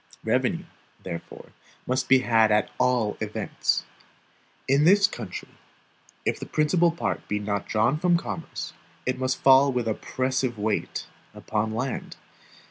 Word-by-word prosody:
Revenue, - - 0 0.4
therefore, 85 -2 -8 0.4
must 130 +1 -1
be 135 - +8
had 115 -3 +4
at 105 0 +2
all 120 -4 +2
events. - - -1 0.8
In 140 +2 +4
this 200 +5 +6
country, 205 - -5 0.8
if - - 0
the - - -7
principal 165 +3 +3
part 170 +1 -3
be 105 - -1
not 100 -1 -2
drawn 115 +7 +2
from 175 0 +3
commerce, 160 -2 -6 0.3
it 125 0 -1
must 130 0 -1
fall 135 +1 +7
with 125 -3 -1
oppressive 130 +2 -1
weight 105 0 -2 0.3
upon 110 0 -2
land. 125 +2 -4
130 Hz, 130 wpm, -26 LUFS, 110-150 Hz, 0.8 s, be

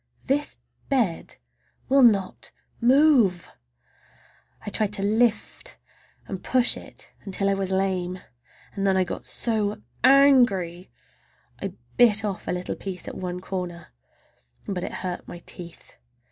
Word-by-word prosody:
This 290 +2 0 0.3
bed 230 -12 0 0.5
will 275 +2 +4
not 205 -6 +3 0.3
move! 250 - +4 1.1
I 205 - -4
tried 210 -1 0
to 195 - +4
lift 220 +2 0 0.5
and 190 -2 -7
push 255 -2 +4
it - - -11
until 195 0 -2
I 200 - +3
was 195 -1 -2
lame, 190 -1 -1 0.6
and 200 -1 -1
then 190 -1 +3
I 185 - +3
got 180 - -6
so 215 -2 -1 0.2
angry 240 -10 +4 0.7
I - - -4 0.2
bit 220 -4 +5
off 200 -3 -4
a - - 0
little 180 0 -3
piece 190 -2 -6
at - - -5
one 180 -1 -5
corner—but 175 - -8
it - - -4
hurt 180 -1 -5
my - - -8
teeth. 170 -2 -10
195 Hz, 130 wpm, -25 LUFS, 180-235 Hz, 1.1 s, bit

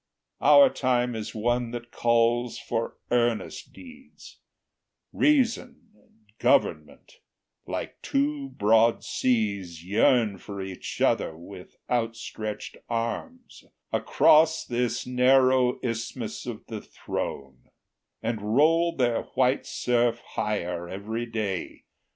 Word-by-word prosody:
Our 280 -2 +7
time 125 -2 0
is 110 0 -6
one 120 +2 0
that 120 0 -7
calls 120 +1 +1
for 115 -1 -3
earnest 120 -2 0
deeds: 260 0 -15 0.7
Reason 260 -4 +1
and 105 0 -30
Government, 75 -2 0 0.5
like - - -5
two 140 0 -1
broad 115 -1 +3
seas, 100 -9 -1
Yearn 105 0 +2
for 100 +1 -8
each 95 -1 -6
other 80 - +1
with 90 +2 -12
outstretched 115 -3 -3
arms 120 - -4 0.3
Across 160 +1 +4
this 120 0 -1
narrow 130 0 +3
isthmus 115 -1 -4
of - - -6
the - - -6
throne, 65 -2 -6 0.5
And 110 -1 -2
roll 165 +4 +4
their 120 -4 +1
white 130 +1 +2
surf 120 -1 +1
higher 90 -5 -2
every 110 +5 -4
day. 105 -5 -4
120 Hz, 105 wpm, -26 LUFS, 105-130 Hz, 0.7 s, Our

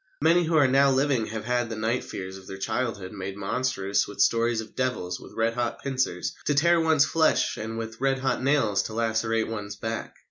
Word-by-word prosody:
Many 170 +2 +4
who 165 0 0
are 145 -3 +6
now 135 +2 +4
living 135 -4 +1
have 110 0 -5
had 120 -1 0
the 115 - -4
night 110 +3 -1
fears 95 0 -6
of 95 -1 -12
their 95 - -7
childhood 110 -2 -2
made 100 -1 -6
monstrous 100 -2 0
with 105 - -10
stories 115 0 +3
of 110 -1 -7
devils 125 -9 -2
with - - -13
red 115 +1 +1
hot 120 0 -3
pincers 130 -10 -1
to 145 - +1
tear 170 +4 +4
one's 160 -3 +4
flesh 160 -1 +2
and 110 +1 -5
with 115 +1 -6
red 135 0 +2
hot 130 0 -1
nails 130 -8 +2
to 110 - -6
lacerate 115 0 0
one's 105 -2 -5
back. 110 +2 -5
115 Hz, 210 wpm, -26 LUFS, 105-135 Hz, -, are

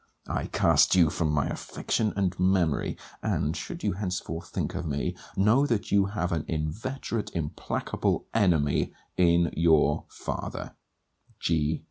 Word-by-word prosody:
I - - -2
cast - - +4
you 85 -4 +5
from 80 -3 0
my 70 -2 +1
affection 110 -2 -1
and 95 -2 +1
memory. 90 -5 +2 0.2
And, 75 +3 0
should 165 - -6
you 105 - +2
henceforth 90 -3 -4
think - - -2
of 85 - -3
me, 70 -1 -2 0.2
know 110 +9 +4
that 115 -4 -1
you 100 -1 +4
have 100 -3 -2
an 80 -2 0
inveterate 105 - -3
implacable 75 -3 -1
enemy, 85 -10 +2 0.2
in 85 -2 +4
your 80 -1 +3
father, - - -5 0.7
G. 80 -1 +1
85 Hz, 135 wpm, -28 LUFS, 80-100 Hz, 0.7 s, you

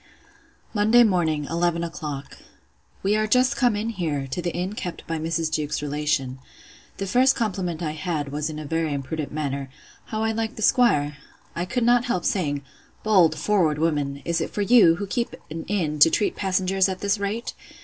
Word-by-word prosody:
Monday 220 +3 +5
morning, 165 -8 +1
eleven 170 0 0
o'clock. 150 -4 -6 0.6
We 200 +2 +2
are 215 0 +1
just 255 +3 +3
come 245 -5 +2
in 215 +2 -2
here, 160 -9 -2
to 175 - -2
the 175 0 -2
inn 180 +4 -3
kept 180 -5 -6
by 165 -1 -3
Mrs. 165 0 -1
Jewkes's 150 -1 -2
relation. 145 -3 -1 0.6
The 195 - -3
first 255 +7 +4
compliment 180 -6 -2
I 155 - -1
had, 150 -2 -3
was 150 +2 -2
in 155 - -6
a 155 - -6
very 160 0 -1
impudent 145 +2 -4
manner, 140 -3 -3 0.4
How 220 0 -3
I 225 - +1
liked 225 0 -3
the 220 - -5
'squire?—I 150 - 0
could 245 +6 -1
not 240 +1 +4
help 185 -8 -1
saying, 145 -7 0 0.4
Bold, 180 -7 +4
forward 165 -3 +2
woman! 145 -3 -1
Is 170 0 0
it - - -2
for 205 - -2
you, 205 -7 +6
who 200 - -4
keep 235 +4 -2 0.2
an 160 +1 -5
inn, 160 -7 -1
to 155 - +8
treat 205 - 0
passengers 190 0 +1
at 185 -1 -5
this 200 +1 +1
rate? 205 +4 -3
170 Hz, 185 wpm, -24 LUFS, 150-205 Hz, 0.6 s, to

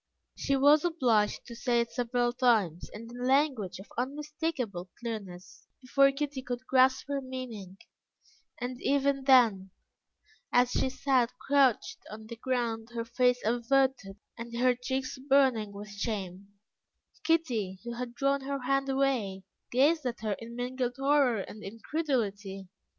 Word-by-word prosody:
She 275 - 0
was 290 +3 +5
obliged 245 -12 +1
to 235 - -9
say 240 0 +1
it 235 0 -1
several 245 0 0
times, 220 - +1
and 230 +2 -9
in 245 +1 -7
language 260 - +1
of 190 - -10
unmistakable 275 - -3
clearness, 200 -6 -7
before 275 +1 +4
Kitty 280 -1 -3
could 250 0 -5
grasp 260 0 +3
her 280 -1 -2
meaning; 240 -8 -7 0.8
and 250 0 -5
even 275 -1 +1
then, 225 -8 +5 0.8
as 245 0 +4
she 260 - +1
sat 260 -2 +1
crouched 270 -4 +2
on 220 +1 -9
the 235 +2 -8
ground, 230 -2 -2
her 230 0 -2
face 250 +1 +1
averted 245 -2 +1 0.2
and 235 0 -6
her 250 +1 +4
cheeks 260 +1 -4
burning 260 -6 +2
with 205 +1 -9
shame, 200 -3 -4 0.8
Kitty, 245 - 0
who 235 0 -5
had 240 0 -6
drawn 275 +2 +1
her 275 0 -4
hand 275 +1 +1
away, 255 -9 0 0.3
gazed 285 +3 +3
at 235 -2 -5
her 215 -2 -1
in 230 +1 -9
mingled 245 0 -2
horror 270 -5 +3
and 215 +2 -9
incredulity. 205 - -3
245 Hz, 140 wpm, -29 LUFS, 220-270 Hz, 0.8 s, was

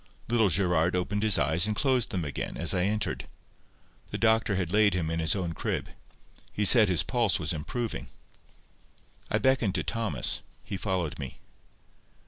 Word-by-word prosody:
Little 115 -3 +3
Gerard 90 -2 +2
opened 95 +3 -1
his 110 -2 +3
eyes 80 +7 +3
and 105 - -1
closed 130 -1 +1
them 90 -8 -3
again, 70 -3 -5
as 80 +2 +1
I 90 - +1
entered. 105 +1 -2 0.8
The - - -4
doctor 110 -2 +2
had 90 -1 -2
laid 105 -3 +4
him 80 -3 -2
in 80 - -2
his 80 +1 +1
own 90 -4 -3
crib. - - -3 0.6
He 105 - -1
said 110 0 +7
his 85 -5 +2
pulse 115 -5 +1
was 80 -1 -2
improving. 115 +9 -4 1.2
I - - +1
beckoned 130 -7 +1
to 85 - 0
Thomas. 115 +2 0 0.2
He - - -6
followed 95 -6 -2
me. 70 -4 -7
95 Hz, 165 wpm, -28 LUFS, 85-110 Hz, 1.2 s, said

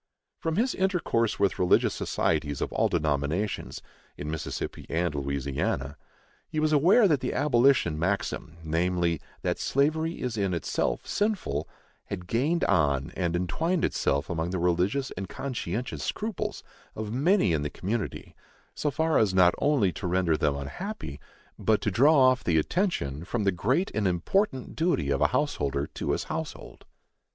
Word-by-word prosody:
From 160 -1 -1
his 245 +6 +1
intercourse 180 - 0
with 100 -2 +1
religious 90 - +3
societies 75 -3 -1
of - - -3
all - - +2
denominations, 75 +7 -1 0.3
in 75 +1 -4
Mississippi 80 -1 -5
and 85 -1 0
Louisiana, 70 -1 -2 0.5
he 155 - -2
was 155 0 +2
aware 185 - +6
that 150 -6 +2
the 125 - -2
abolition 125 - +3
maxim, 85 -2 -2
namely, 85 +1 0 0.2
that - - -1
slavery 160 +4 +1
is 125 -3 -3
in 100 -3 0
itself 85 - -1
sinful, 195 - -1 0.4
had 90 -3 -6
gained 140 - +1
on 75 -5 +2
and 85 -2 -1
entwined 160 - 0
itself 70 0 0
among 85 -1 -2
the 95 - -2
religious 90 +10 +1
and 95 0 -6
conscientious 125 -3 -4
scruples 215 -2 -3 0.3
of 110 0 -4
many 145 - +3
in 75 - +1
the 75 - -2
community 105 +5 -4 0.4
so 150 - -1
far 160 +2 +2
as 100 -4 +2
not 90 -1 +6
only 140 -10 +3
to 90 - -5
render 90 -2 +2
them 75 -2 +1
unhappy, 70 - -6 0.4
but 110 -1 +2
to 105 - 0
draw 145 - +5
off 130 -1 +5
the 85 -2 +2
attention 80 - 0
from 105 +4 -2
the 100 - +3
great 130 - 0
and 105 -2 +1
important 130 - 0
duty 155 - +1
of 70 - 0
a - - +6
householder 70 0 0
to 75 - -6
his - - -1
household. - - -6
95 Hz, 155 wpm, -27 LUFS, -, 0.5 s, aware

